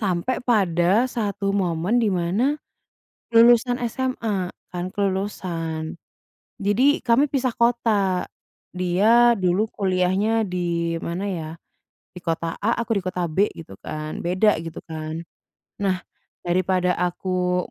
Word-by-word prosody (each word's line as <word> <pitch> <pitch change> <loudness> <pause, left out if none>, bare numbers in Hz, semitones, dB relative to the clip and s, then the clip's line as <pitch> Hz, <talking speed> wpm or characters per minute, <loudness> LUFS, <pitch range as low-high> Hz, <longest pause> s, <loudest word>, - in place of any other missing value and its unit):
Sampai 195 +4 0
pada 200 +1 +2
satu 200 -3 -2
momen 190 +3 +1
di 220 -4 +2
mana 195 +12 +1 0.8
lulusan 240 +1 +5
SMA, 225 -8 -2 0.2
kan 175 0 -2
kelulusan. 185 -5 -2 0.6
Jadi, 225 +9 +3
kami 250 +5 +4
pisah 260 -3 0
kota. 215 -6 +2 0.5
Dia 215 +7 +4
dulu 185 +4 +2
kuliahnya 195 +3 +1
di 170 -2 -1
mana 175 +4 -3
ya, 165 -5 -4 0.7
di - - -7
kota 165 -1 -2
A 230 +3 0
aku 230 -1 -1
di 190 - -2
kota 180 -1 -1
B 185 +6 +2
gitu 160 -12 -11
kan, 155 +1 -5
beda 185 +5 +3
gitu 165 0 -7
kan. 155 0 -5 0.6
Nah, 185 -2 +1 0.4
daripada 180 0 +1
aku 180 0 0
190 Hz, 120 wpm, -23 LUFS, 175-225 Hz, 0.8 s, lulusan